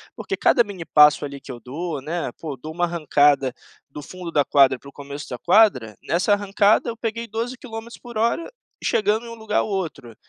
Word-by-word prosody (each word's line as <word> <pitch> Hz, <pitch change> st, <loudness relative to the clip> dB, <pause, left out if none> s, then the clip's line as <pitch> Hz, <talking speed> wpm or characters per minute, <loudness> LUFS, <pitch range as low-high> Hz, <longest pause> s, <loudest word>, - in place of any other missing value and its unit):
Porque 390 Hz, -, -4 dB
cada 240 Hz, -, +4 dB
mini 200 Hz, -5 st, -8 dB
passo 150 Hz, -2 st, +5 dB
ali 140 Hz, -1 st, -6 dB
que 135 Hz, -, -10 dB
eu 120 Hz, -, -8 dB
dou, 150 Hz, +3 st, -4 dB
né, 165 Hz, +5 st, -3 dB
pô, 150 Hz, -5 st, -6 dB
dou 155 Hz, +5 st, -8 dB
uma 175 Hz, +1 st, +1 dB
arrancada 145 Hz, -5 st, +2 dB, 0.3 s
do 145 Hz, +1 st, -9 dB
fundo 175 Hz, +3 st, -8 dB
da 145 Hz, -, +3 dB
quadra 135 Hz, -2 st, +4 dB
para 140 Hz, -, -13 dB
o -, -, -15 dB
começo 140 Hz, +1 st, -8 dB
da 125 Hz, -, -5 dB
quadra, 170 Hz, -, +3 dB
nessa 185 Hz, +5 st, +1 dB
arrancada 205 Hz, +2 st, +2 dB
eu 230 Hz, -, -5 dB
peguei 230 Hz, 0 st, -4 dB
12, 230 Hz, +4 st, -3 dB
quilômetros 235 Hz, -2 st, -9 dB
por 240 Hz, -2 st, -8 dB
hora, 235 Hz, -, 0 dB, 0.3 s
chegando 220 Hz, +2 st, +1 dB
em -, -, -8 dB
um 230 Hz, -, -8 dB
lugar 220 Hz, -1 st, -1 dB
ao -, -, -1 dB
outro, 165 Hz, -, -4 dB
175 Hz, 210 wpm, -22 LUFS, 140-220 Hz, 0.3 s, passo